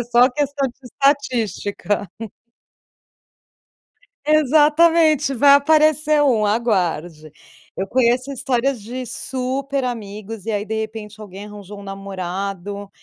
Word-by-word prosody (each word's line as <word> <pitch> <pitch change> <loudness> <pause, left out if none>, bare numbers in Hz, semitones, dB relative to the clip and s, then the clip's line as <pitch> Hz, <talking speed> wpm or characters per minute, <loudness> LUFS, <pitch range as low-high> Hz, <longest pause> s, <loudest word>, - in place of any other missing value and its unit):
É - - -2
só 240 +1 +4
questão 285 +1 -1
de 240 - -15
estatística. 230 - -1 2.2
Exatamente, 310 0 +4
vai 280 +2 +5
aparecer 305 +1 +4
um, 235 -7 +3
aguarde. 175 -8 -1 0.4
Eu 195 - -3
conheço 250 +3 +1
histórias 265 -1 -1
de 250 +5 -6
super 265 +3 -3
amigos 215 -3 -6
e 225 - -2
aí, 205 -1 -2
de 220 - -4
repente, 220 -1 -8
alguém 200 -1 -9
arranjou 205 -1 -10
um - - -10
namorado, 195 0 -5
235 Hz, 110 wpm, -20 LUFS, 205-275 Hz, 2.2 s, vai